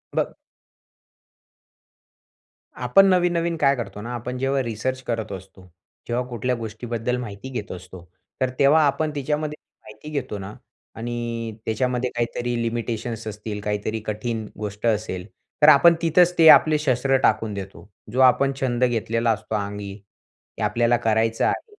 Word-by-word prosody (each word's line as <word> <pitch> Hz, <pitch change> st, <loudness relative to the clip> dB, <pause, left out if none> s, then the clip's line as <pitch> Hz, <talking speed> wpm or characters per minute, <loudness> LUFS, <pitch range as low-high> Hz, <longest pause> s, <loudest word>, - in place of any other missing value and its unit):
ब -, -, 0 dB, 2.5 s
आपण 195 Hz, 0 st, +6 dB
नवीन-नवीन 175 Hz, -2 st, +1 dB
काय 140 Hz, -2 st, +3 dB
करतो 115 Hz, -4 st, -6 dB
ना, 120 Hz, +3 st, -6 dB
आपण 125 Hz, +2 st, -5 dB
जेव्हा 135 Hz, +1 st, 0 dB
रिसर्च 125 Hz, +3 st, -3 dB
करत 110 Hz, -3 st, -2 dB
असतो, 95 Hz, 0 st, -10 dB, 0.5 s
जेव्हा 125 Hz, +1 st, -1 dB
कुठल्या 125 Hz, +1 st, -1 dB
गोष्टीबद्दल 115 Hz, +1 st, -3 dB
माहिती 120 Hz, 0 st, -7 dB
घेत 120 Hz, -6 st, -5 dB
असतो. 90 Hz, 0 st, -10 dB, 0.4 s
तर 130 Hz, -, +2 dB
तेव्हा 150 Hz, +3 st, +5 dB
आपण 150 Hz, +2 st, 0 dB
तिच्यामध्ये 150 Hz, +2 st, -2 dB, 0.2 s
माहिती 110 Hz, +7 st, -12 dB
घेतो 140 Hz, -8 st, -3 dB
ना, 95 Hz, +2 st, -7 dB, 0.4 s
आणि 115 Hz, -1 st, -4 dB
त्याच्यामध्ये 125 Hz, +2 st, 0 dB
काहीतरी 120 Hz, +1 st, -2 dB
लिमिटेशन्स 115 Hz, 0 st, -3 dB
असतील 105 Hz, 0 st, -5 dB
काहीतरी 105 Hz, +2 st, -2 dB
कठीण 110 Hz, +1 st, -3 dB
गोष्ट 105 Hz, +1 st, -5 dB
असेल, 105 Hz, -5 st, -1 dB, 0.4 s
तर 150 Hz, -, +8 dB
आपण 155 Hz, +3 st, +7 dB
तिथचं 170 Hz, +1 st, +4 dB
ते 165 Hz, -, +7 dB
आपले 155 Hz, 0 st, +7 dB
शस्त्र 135 Hz, -2 st, +2 dB
टाकून 110 Hz, -2 st, +2 dB
देतो. 95 Hz, -3 st, -8 dB, 0.2 s
जो 125 Hz, -, -2 dB
आपण 130 Hz, +2 st, +5 dB
छंद 125 Hz, -2 st, 0 dB
घेतलेला 115 Hz, -1 st, +1 dB
असतो 110 Hz, 0 st, -3 dB
अंगी, 100 Hz, -1 st, -4 dB, 0.6 s
ते -, -, -6 dB
आपल्याला 120 Hz, 0 st, +2 dB
करायचं 115 Hz, -1 st, +1 dB
आहे -, -, 0 dB
120 Hz, 140 wpm, -23 LUFS, 110-135 Hz, 2.5 s, तर